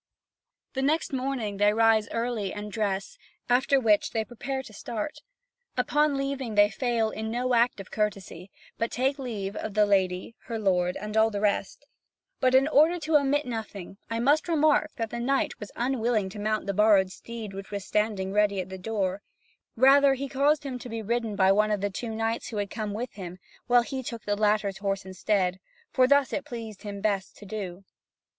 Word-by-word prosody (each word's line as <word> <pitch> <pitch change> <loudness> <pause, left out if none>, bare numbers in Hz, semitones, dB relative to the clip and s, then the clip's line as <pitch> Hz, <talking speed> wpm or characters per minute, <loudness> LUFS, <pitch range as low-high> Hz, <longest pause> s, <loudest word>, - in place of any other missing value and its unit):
The 265 - -2
next 305 +2 +1
morning 255 -6 -2
they 205 +1 +4
rise 225 -1 +3
early, 230 -4 -2
and 210 0 -6
dress, 200 -2 -2 0.3
after 265 +3 +3
which 215 -5 +3
they 220 -1 -2
prepare 265 +3 -4
to 215 - -13
start. 225 +6 -5 0.6
Upon 295 +3 +2
leaving, 275 -5 -3
they 205 0 +5
fail 230 0 0
in 220 0 -4
no 250 +2 -1
act 235 -2 +3
of 195 - -9
courtesy, 195 -4 -3 0.3
but 230 - 0
take 270 +3 0
leave 210 -6 -4
of 215 -1 -5
the 210 0 +5
lady, 190 0 +1
her 230 - -4
lord, 180 -4 +1
and 210 +1 -6
all 220 0 +5
the 205 -2 -3
rest. 210 - -1 0.5
But 255 -1 +3
in 270 +2 +5
order 315 +3 +4
to 320 -1 -1
omit 290 +1 +1
nothing, 215 -5 -6
I 230 0 -2
must 290 +8 +3
remark 310 -1 +3
that 225 -4 -3
the 235 - -4
knight 270 +3 0
was 210 - -8
unwilling 235 -5 0
to 205 - -9
mount 215 +1 -1
the 200 - -1
borrowed 200 -2 +4
steed 225 -1 -8
which 195 0 -8
was 200 -2 -5
standing 205 -3 -1
ready 205 -1 +2
at 185 0 -4
the 190 0 -7
door; 195 -1 -2 0.5
rather, 275 +2 +6
he 275 +1 -4
caused 285 +3 +2
him 260 -3 -5
to 245 - -8
be 225 -1 -4
ridden 230 -1 -1
by 190 -1 +4
one 210 +2 +3
of 210 -1 0
the 205 0 -1
two 230 +5 -5
knights 225 +1 -2
who 220 - -5
had 205 -1 -2
come 210 -2 -3
with 240 +2 -4
him, 180 -3 -8 0.3
while 245 0 +5
he 265 +2 -4
took 235 -3 -6
the 205 - 0
latter's 205 -2 +1
horse 195 -1 -2
instead, 190 0 0 0.3
for 255 -1 +4
thus 280 -1 +3
it 280 - -1
pleased 230 -7 -8
him 205 -2 -6
best 200 -2 -1
to 205 - -12
do. 195 -3 -6
220 Hz, 200 wpm, -27 LUFS, 200-255 Hz, 0.6 s, rather